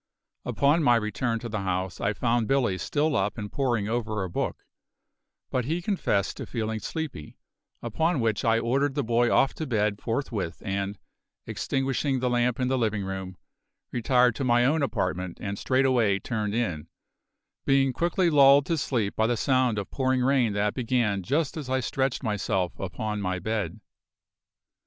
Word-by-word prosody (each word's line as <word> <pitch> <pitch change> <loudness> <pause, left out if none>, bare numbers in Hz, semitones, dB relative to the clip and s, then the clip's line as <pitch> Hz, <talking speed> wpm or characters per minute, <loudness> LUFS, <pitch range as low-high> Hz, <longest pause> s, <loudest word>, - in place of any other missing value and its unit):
Upon 145 +4 +2
my 120 -5 +5
return 115 +1 -1
to 120 - -5
the 105 -2 -3
house 95 -1 -2
I 100 - +1
found 115 0 0
Billy 120 -9 +1
still 150 0 0
up 105 0 0
and 105 -2 -5
poring 120 -7 0
over 110 -3 -2
a 90 - -5
book; - - -3 0.9
but 125 -2 0
he 160 +6 -1
confessed 170 - -1
to - - -6
feeling 110 -2 -3
sleepy, 150 - -6 0.5
upon 155 +8 0
which 110 -3 0
I 115 0 +3
ordered 135 +5 0
the 145 - 0
boy 120 +1 +2
off 135 - +3
to 155 - -5
bed 105 -4 0
forthwith 115 -8 -3
and, 100 0 -2 0.5
extinguishing 135 0 -1
the 125 0 0
lamp 120 0 +1
in 125 - +1
the 130 0 +1
living 105 -4 0
room, 95 -1 -5 0.5
retired 125 +1 +3
to - - -2
my 120 -1 +3
own 150 +4 +2
apartment 90 -8 -2
and 100 0 -4
straightway 130 -6 +2
turned 105 -1 -3
in; 90 -11 -2 0.8
being 135 -1 +3
quickly 175 +2 +1
lulled 140 -1 +6
to 165 -2 0
sleep 115 -7 -1
by 110 - +2
the 120 0 0
sound 130 -3 +2
of 100 - -4
pouring 130 -1 +1
rain 130 -5 +2
that 105 0 0
began 115 -5 0
just 140 - 0
as 145 -5 -6
I 130 0 +1
stretched 130 +1 -1
myself 95 -5 -1
upon 105 +3 -3
my 95 -1 -1
bed. 105 -2 -3
120 Hz, 170 wpm, -26 LUFS, 105-135 Hz, 0.9 s, lulled